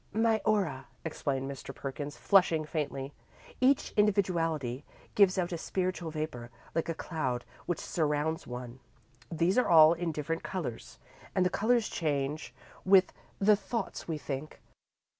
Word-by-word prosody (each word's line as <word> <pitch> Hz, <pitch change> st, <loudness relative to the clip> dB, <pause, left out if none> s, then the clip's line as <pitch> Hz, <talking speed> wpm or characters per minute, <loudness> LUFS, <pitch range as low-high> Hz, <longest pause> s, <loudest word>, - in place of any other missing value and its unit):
"My 225 Hz, 0 st, +2 dB
aura," 170 Hz, -11 st, +1 dB, 0.2 s
explained 135 Hz, -4 st, -2 dB
Mr. 140 Hz, -1 st, -7 dB
Perkins, 145 Hz, +1 st, -5 dB
flushing 175 Hz, -6 st, +4 dB
faintly. 145 Hz, -3 st, -3 dB, 0.5 s
"Each 265 Hz, +2 st, +3 dB
individuality 165 Hz, -, +1 dB, 0.3 s
gives 195 Hz, -2 st, +5 dB
out 180 Hz, -1 st, 0 dB
a 170 Hz, -, -3 dB
spiritual 185 Hz, -1 st, -2 dB
vapour, 155 Hz, -7 st, -5 dB, 0.2 s
like 165 Hz, +1 st, -1 dB
a 165 Hz, -, -1 dB
cloud, 130 Hz, -9 st, -3 dB, 0.2 s
which 175 Hz, -2 st, -1 dB
surrounds 155 Hz, 0 st, -1 dB
one. 125 Hz, 0 st, -7 dB, 0.5 s
These 170 Hz, +7 st, +2 dB
are 250 Hz, -, +1 dB
all 160 Hz, -1 st, +8 dB
in 170 Hz, 0 st, -2 dB
different 160 Hz, +2 st, -3 dB
colours, 160 Hz, -12 st, -5 dB, 0.4 s
and 185 Hz, -, +3 dB
the 180 Hz, -, +2 dB
colours 235 Hz, 0 st, +2 dB
change 150 Hz, -1 st, -2 dB, 0.3 s
with 190 Hz, 0 st, +5 dB, 0.2 s
the 210 Hz, +1 st, +5 dB
thoughts 220 Hz, 0 st, -4 dB
we 160 Hz, -2 st, -2 dB
think. 145 Hz, 0 st, -6 dB
165 Hz, 140 wpm, -30 LUFS, 145-185 Hz, 0.5 s, all